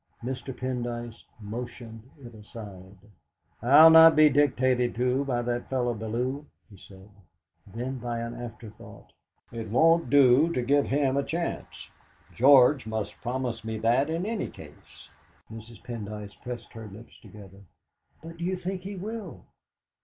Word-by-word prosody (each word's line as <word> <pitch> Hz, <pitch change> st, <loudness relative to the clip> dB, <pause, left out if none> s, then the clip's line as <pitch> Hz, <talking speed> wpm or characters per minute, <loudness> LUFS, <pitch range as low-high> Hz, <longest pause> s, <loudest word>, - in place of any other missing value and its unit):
Mr. 130 Hz, +2 st, -5 dB
Pendyce 120 Hz, -2 st, -5 dB
motioned 115 Hz, +1 st, -8 dB, 0.2 s
it 120 Hz, -4 st, -13 dB
aside. 100 Hz, -3 st, -12 dB, 0.6 s
"I'll 145 Hz, +7 st, +8 dB
not 160 Hz, -1 st, +8 dB
be 155 Hz, 0 st, +6 dB
dictated 130 Hz, -3 st, +1 dB
to 125 Hz, +3 st, 0 dB
by 120 Hz, -3 st, -1 dB
that 120 Hz, 0 st, -3 dB
fellow 125 Hz, -2 st, -1 dB
Bellew," 120 Hz, +6 st, -3 dB, 0.3 s
he 100 Hz, -, -14 dB
said. 95 Hz, +1 st, -16 dB, 0.6 s
Then, 125 Hz, +3 st, -5 dB
by 120 Hz, 0 st, -4 dB
an 115 Hz, 0 st, -5 dB
afterthought: 115 Hz, -2 st, -11 dB, 0.4 s
"It 115 Hz, -2 st, -7 dB
won't 165 Hz, +8 st, +3 dB
do 140 Hz, +3 st, +5 dB
to 125 Hz, -, -1 dB
give 140 Hz, +3 st, +2 dB
him 140 Hz, -1 st, 0 dB
a 140 Hz, -, +1 dB
chance. 170 Hz, +4 st, -5 dB, 0.4 s
George 130 Hz, 0 st, +5 dB
must 110 Hz, -1 st, -5 dB
promise 120 Hz, -2 st, -4 dB
me 110 Hz, 0 st, -4 dB
that 120 Hz, +6 st, +1 dB
in 165 Hz, +3 st, -2 dB
any 225 Hz, 0 st, -3 dB
case." -, -, -15 dB, 0.4 s
Mrs. 110 Hz, -1 st, -12 dB
Pendyce 105 Hz, -4 st, -7 dB
pressed 120 Hz, -1 st, -8 dB
her 115 Hz, -2 st, -9 dB
lips 105 Hz, +4 st, -14 dB
together. 100 Hz, -2 st, -14 dB, 0.6 s
"But 165 Hz, 0 st, -10 dB
do 170 Hz, -, -7 dB
you 185 Hz, +1 st, -1 dB
think 185 Hz, +1 st, -5 dB
he 195 Hz, +2 st, -7 dB
will?" 210 Hz, -1 st, -7 dB
125 Hz, 145 wpm, -26 LUFS, 115-145 Hz, 0.6 s, I'll